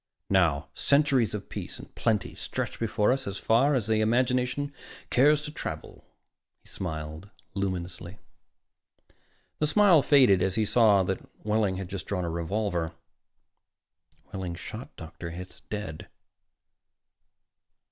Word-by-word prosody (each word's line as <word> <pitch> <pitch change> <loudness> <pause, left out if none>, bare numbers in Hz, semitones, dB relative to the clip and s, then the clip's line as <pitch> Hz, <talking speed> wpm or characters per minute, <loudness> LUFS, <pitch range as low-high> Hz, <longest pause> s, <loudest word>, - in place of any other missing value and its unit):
Now 80 -6 +2
centuries 140 -6 +2
of 100 - -6
peace - - -6
and - - -13
plenty 110 -3 0
stretch - - -4
before 105 -1 +2
us 135 0 -1
as 100 0 -3
far 130 +9 +3
as 120 -6 0
the 110 -1 +2
imagination 125 +4 +1 0.4
cares 145 +4 +4
to 150 - -5
travel." - - -7 0.6
He - - -17
smiled 80 +1 -5 0.2
luminously. 95 -1 -4 1.4
The 150 - +2
smile 180 -1 +6
faded 130 - +5
as 95 0 +1
he 110 - +2
saw 105 -3 +5
that 95 +1 -1 0.3
Wehling 105 -3 +1
had 95 -1 -5
just 95 -2 -6
drawn 90 -3 -1
a 85 - -2
revolver. 85 -1 -2 1.4
Wehling 95 -3 -4
shot 110 +8 -8
Dr. 85 +1 -8
Hitz 90 +2 -9
dead. 105 -7 -5
105 Hz, 125 wpm, -28 LUFS, 90-125 Hz, 1.4 s, smile